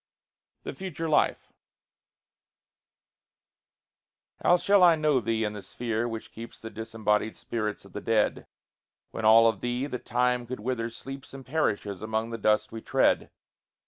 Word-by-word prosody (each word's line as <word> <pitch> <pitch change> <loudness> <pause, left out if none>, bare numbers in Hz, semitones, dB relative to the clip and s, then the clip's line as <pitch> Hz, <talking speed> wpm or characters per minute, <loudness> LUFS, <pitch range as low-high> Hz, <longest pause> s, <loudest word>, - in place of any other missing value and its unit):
THE - - -5
FUTURE 175 -4 -5
LIFE 155 - +1 2.9
How 175 - +5
shall 200 +2 +4
I 175 -2 +7
know 155 -3 +2
thee 115 -1 -1
in 105 -1 -1
the 105 - -7
sphere 115 +2 -3
which 115 -1 -6
keeps 115 +1 -10
The 115 - -8
disembodied 110 -1 -1
spirits 105 -3 -4
of 100 - -16
the 105 - -5
dead, 110 0 +1 0.6
When 110 - -4
all 115 +1 +8
of 115 - 0
thee 125 +2 -1
that 125 -4 -5
time 125 0 +1
could 125 -3 -6
wither 115 -1 -2
sleeps 135 +3 -9
And 135 -1 -10
perishes 105 - -1
among 110 +1 -2
the 115 - -5
dust 105 +1 +2
we 115 - -7
tread? - - +2
115 Hz, 150 wpm, -27 LUFS, 110-130 Hz, 2.9 s, all